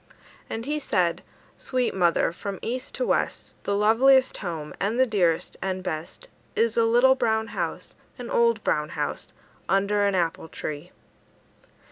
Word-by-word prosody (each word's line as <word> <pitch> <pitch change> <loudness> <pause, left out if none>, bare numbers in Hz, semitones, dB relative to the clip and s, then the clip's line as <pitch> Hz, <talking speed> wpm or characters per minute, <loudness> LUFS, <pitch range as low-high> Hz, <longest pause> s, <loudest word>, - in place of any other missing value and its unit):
And 225 +1 -4
he 300 +2 -1
said: 180 - 0 0.4
"Sweet 255 -2 -1
mother, 175 -3 +2
from 195 +3 -6
east 255 +2 -4
to - - -1
west, - - -1
The 200 - 0
loveliest 255 +6 +4
home, 165 -6 -5
and 215 +5 0
the 260 - +6
dearest 180 -8 0
and 185 -1 -2
best, 170 - -6 0.3
Is 230 -1 +2
a 230 - +4
little 240 +3 +5
brown 220 -3 0
house, - - -4 0.2
An - - -7
old 470 -1 +2
brown - - 0
house, - - -3 0.4
Under 200 +1 +2
an 200 - +1
apple 165 -2 -1
tree." 155 +2 -6
210 Hz, 150 wpm, -25 LUFS, 180-255 Hz, 0.4 s, the